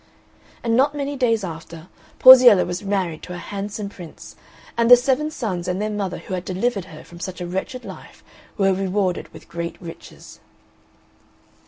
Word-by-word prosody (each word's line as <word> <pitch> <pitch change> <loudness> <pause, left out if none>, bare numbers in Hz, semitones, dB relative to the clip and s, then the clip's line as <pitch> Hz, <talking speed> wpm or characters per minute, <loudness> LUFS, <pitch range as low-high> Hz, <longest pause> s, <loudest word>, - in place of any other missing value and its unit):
And 230 -1 +1
not 285 +4 +2
many 285 0 -3
days 230 -5 +1
after 165 -1 -8 0.3
Porziella 250 -6 +9
was 175 +1 -4
married 190 -6 -2
to 180 - -8
a - - -6
handsome 205 +3 -5
prince, 175 -5 -12 0.4
and 235 0 +2
the 245 - +11
seven 265 +4 0
sons 195 - -4
and 180 +1 -2
their 215 +1 -2
mother 200 -3 -3
who 190 - -8
had 180 -1 -3
delivered 195 +2 -2
her 155 -4 -12
from 170 - -14
such 185 +1 -6
a 180 - -4
wretched 190 +8 -5
life - - -12 0.3
were 195 -2 +3
rewarded 190 -1 -2
with - - -14
great 170 0 -6
riches. 170 -3 -12
195 Hz, 170 wpm, -21 LUFS, 180-235 Hz, 0.4 s, the